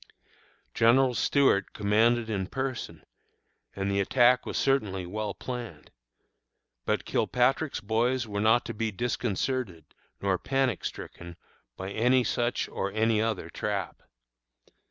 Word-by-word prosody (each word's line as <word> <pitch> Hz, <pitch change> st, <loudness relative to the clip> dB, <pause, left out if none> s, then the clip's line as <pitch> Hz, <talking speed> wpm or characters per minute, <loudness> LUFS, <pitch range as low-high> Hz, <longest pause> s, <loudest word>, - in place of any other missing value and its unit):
General 125 Hz, +3 st, +4 dB
Stuart 130 Hz, -6 st, +2 dB
commanded 110 Hz, +3 st, +2 dB
in 100 Hz, -4 st, -2 dB
person, 130 Hz, +2 st, -4 dB, 0.7 s
and 100 Hz, 0 st, -1 dB
the 100 Hz, -, +1 dB
attack 125 Hz, +5 st, +3 dB
was -, -, -3 dB
certainly 105 Hz, -9 st, +1 dB
well 105 Hz, +3 st, -4 dB
planned. 125 Hz, -2 st, -7 dB, 0.9 s
But -, -, 0 dB
Kilpatrick's 130 Hz, +4 st, +1 dB
boys 115 Hz, +3 st, 0 dB
were 100 Hz, -1 st, -3 dB
not 115 Hz, +3 st, +4 dB
to -, -, -5 dB
be 115 Hz, +1 st, -2 dB
disconcerted 115 Hz, -, -2 dB, 0.3 s
nor 95 Hz, -2 st, 0 dB
panic 135 Hz, -6 st, 0 dB
stricken 85 Hz, 0 st, -7 dB, 0.4 s
by 95 Hz, +1 st, -5 dB
any 125 Hz, +4 st, +3 dB
such 120 Hz, +1 st, -1 dB
or 95 Hz, -, -3 dB
any 110 Hz, 0 st, +2 dB
other 110 Hz, -4 st, -2 dB
trap. -, -, -3 dB
115 Hz, 120 wpm, -28 LUFS, 100-125 Hz, 0.9 s, General